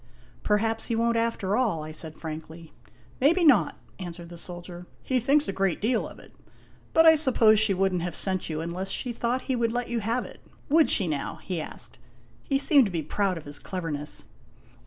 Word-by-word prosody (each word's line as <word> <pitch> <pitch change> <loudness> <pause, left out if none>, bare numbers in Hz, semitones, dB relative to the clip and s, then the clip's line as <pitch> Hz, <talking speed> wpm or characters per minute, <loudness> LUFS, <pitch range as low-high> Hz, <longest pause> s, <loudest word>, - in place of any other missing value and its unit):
" - - -28
Perhaps 225 +2 +1
he 230 - 0
won't 235 +1 +1
after 230 -4 0
all," 215 -11 0
I 155 - -7
said 155 0 -4
frankly. 160 +1 -8 0.2
" 120 - -28
Maybe 335 +6 +4
not," 275 -9 +4 0.2
answered 175 -2 -8
the 175 - -9
soldier; 175 0 -9 0.2
"he 260 -1 +1
thinks 280 +5 +2
a - - -2
great 195 -2 0
deal 235 +4 0
of - - -12
it. - - -16 0.6
But 325 0 +5
I 320 - +9
suppose 240 -8 +4
she 215 -3 +3
would 190 0 +1
n't 180 - -1
have 175 -1 -4
sent 185 -3 -1
you 155 0 -3
unless 175 +3 -4
she 245 +4 -1
thought 240 +2 -1
he 260 - -1
would 230 -1 0
let 245 0 -2
you 235 -1 -1
have 230 +4 -1
it. - - -12 0.3
Would 315 +2 +5
she, 195 - +3
now?" 150 -3 -3
he 180 -4 -3
asked. - - -9 0.4
He 275 - 0
seemed 280 -1 +5
to 200 - -3
be 165 -3 -2
proud 190 +4 -1
of 160 - -9
his 145 0 -4
cleverness. 155 -5 -5
195 Hz, 215 wpm, -26 LUFS, 170-240 Hz, 0.6 s, I